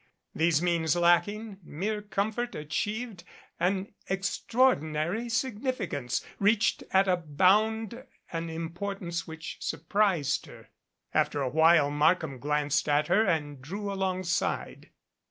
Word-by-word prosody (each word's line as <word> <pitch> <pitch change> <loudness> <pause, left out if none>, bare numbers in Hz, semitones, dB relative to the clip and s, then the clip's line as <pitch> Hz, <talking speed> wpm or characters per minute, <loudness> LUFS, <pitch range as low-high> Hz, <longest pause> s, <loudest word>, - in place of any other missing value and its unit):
Those 165 0 +2
means 170 -3 +2
lacking, 195 +5 +2
mere 200 +7 -3
comfort 215 +4 -2
achieved 200 +7 -3 0.4
an 190 +3 0 0.2
extraordinary 195 - +1
significance 220 - -2
reached 210 +2 +2
at 195 +1 +3
a 185 - +4
bound 215 - +1 0.3
an 165 0 -3
importance 170 +2 -4
which 160 0 -7
surprised 165 -2 0
her. - - -14 0.4
After 145 - +1
a 130 - 0
while 160 0 +5
Markham 150 -2 +2
glanced 150 +1 0
at 145 +1 +2
her 215 - +4
and 150 -6 -1
drew 200 +8 -5
alongside. 185 -2 -2
180 Hz, 110 wpm, -28 LUFS, 160-205 Hz, 0.4 s, while